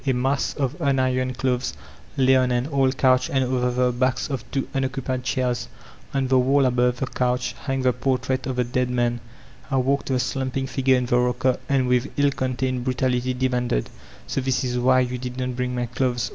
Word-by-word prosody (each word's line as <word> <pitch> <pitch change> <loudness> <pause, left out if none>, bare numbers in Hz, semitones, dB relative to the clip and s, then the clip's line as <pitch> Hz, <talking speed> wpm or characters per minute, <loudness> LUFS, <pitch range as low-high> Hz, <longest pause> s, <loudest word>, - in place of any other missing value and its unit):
A 135 - +3
mass 135 +3 0
of 135 -1 -1
unironed 130 -3 +1
clothes 125 -1 0 0.4
lay 130 0 +5
on 130 -1 +3
an 120 0 +1
old 135 -1 +2
coudi 130 -1 +3
and 135 -1 +2
over 125 -1 0
the 125 0 +1
backs 130 +3 0
of 135 - -3
two 135 -1 -2
unoccupied 130 -1 -2
chairs. 125 -2 -1 0.4
On 135 -1 0
the 130 0 +4
wall 135 +2 +3
above 125 0 +2
the 130 - -1
conch, 125 -1 -1
hung 135 -1 -3
the 125 -1 +3
portrait 130 0 -1
of 130 - -2
the 125 - +1
dead 125 +1 -1
man. 120 -1 0 0.5
I 135 - +1
walked 135 +2 +1
to 135 - 0
the 130 - +2
slumping 130 +1 -2
figure 130 0 +2
in 125 - -1
the 120 0 +2
rodcer, 125 +1 +1
and 135 -2 +2
witfi 125 +2 +1
ill 145 0 +3
contained 130 -1 -2
brutality 125 0 0
demanded: 125 - -1 0.4
''So 135 - -1
diis 130 +1 0
is 125 -1 -1
why 130 +1 +4
yoa 125 0 -5
did 125 0 -5
not 125 -1 -2
bring 125 0 -2
my 120 0 -1
clothes 120 +1 -1
130 Hz, 205 wpm, -23 LUFS, 125-130 Hz, 0.5 s, lay